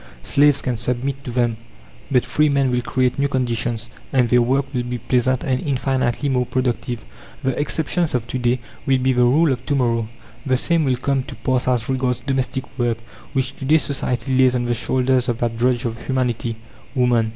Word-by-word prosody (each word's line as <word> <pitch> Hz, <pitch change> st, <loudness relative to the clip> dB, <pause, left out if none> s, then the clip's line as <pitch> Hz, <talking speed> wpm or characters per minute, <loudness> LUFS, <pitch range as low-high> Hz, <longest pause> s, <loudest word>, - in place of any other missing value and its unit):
Slaves 145 Hz, 0 st, +3 dB
can 125 Hz, -3 st, -1 dB
submit 125 Hz, +4 st, -2 dB
to -, -, -4 dB
them, 120 Hz, -2 st, +1 dB, 0.5 s
but 125 Hz, -3 st, +2 dB
free 150 Hz, +4 st, +2 dB
men 140 Hz, -2 st, +2 dB
will 125 Hz, 0 st, +1 dB
create 125 Hz, +1 st, 0 dB
new 140 Hz, -, +3 dB
conditions, 120 Hz, -3 st, -1 dB, 0.2 s
and 125 Hz, -3 st, +3 dB
their 125 Hz, 0 st, +5 dB
work 130 Hz, +3 st, +2 dB
will 125 Hz, -, 0 dB
be 120 Hz, 0 st, -3 dB
pleasant 125 Hz, +2 st, +1 dB
and 130 Hz, -1 st, 0 dB
infinitely 130 Hz, -2 st, 0 dB
more 125 Hz, -2 st, +1 dB
productive. 125 Hz, -2 st, -2 dB, 0.4 s
The 130 Hz, -, +2 dB
exceptions 160 Hz, +1 st, 0 dB
of 120 Hz, -2 st, -1 dB
to 130 Hz, -, -2 dB
day 120 Hz, 0 st, +1 dB, 0.3 s
will 135 Hz, -1 st, +4 dB
be 130 Hz, +1 st, +2 dB
the 125 Hz, -, +2 dB
rule 140 Hz, +6 st, +4 dB
of 125 Hz, -1 st, -2 dB
to 145 Hz, -, +1 dB
morrow. 115 Hz, -4 st, +1 dB, 0.3 s
The 130 Hz, -2 st, +2 dB
same 165 Hz, +3 st, +2 dB
will 130 Hz, -2 st, +1 dB
come 135 Hz, +1 st, 0 dB
to 135 Hz, -, -8 dB
pass 125 Hz, +2 st, 0 dB
as 125 Hz, -3 st, +1 dB
regards 130 Hz, -2 st, 0 dB
domestic 135 Hz, -1 st, -1 dB, 0.2 s
work, 120 Hz, -1 st, +1 dB, 0.4 s
which 135 Hz, -1 st, -1 dB
to 135 Hz, -, -6 dB
day 155 Hz, +4 st, +5 dB
society 130 Hz, -3 st, -1 dB
lays 130 Hz, -1 st, +4 dB
on 120 Hz, -1 st, 0 dB
the 120 Hz, -, +1 dB
shoulders 130 Hz, +1 st, +1 dB
of 120 Hz, -, 0 dB
that 115 Hz, -1 st, -1 dB
drudge 125 Hz, +2 st, +1 dB
of 115 Hz, 0 st, -4 dB
humanity 120 Hz, -3 st, -1 dB, 0.4 s
woman. 120 Hz, -3 st, +3 dB
125 Hz, 200 wpm, -21 LUFS, 120-135 Hz, 0.5 s, their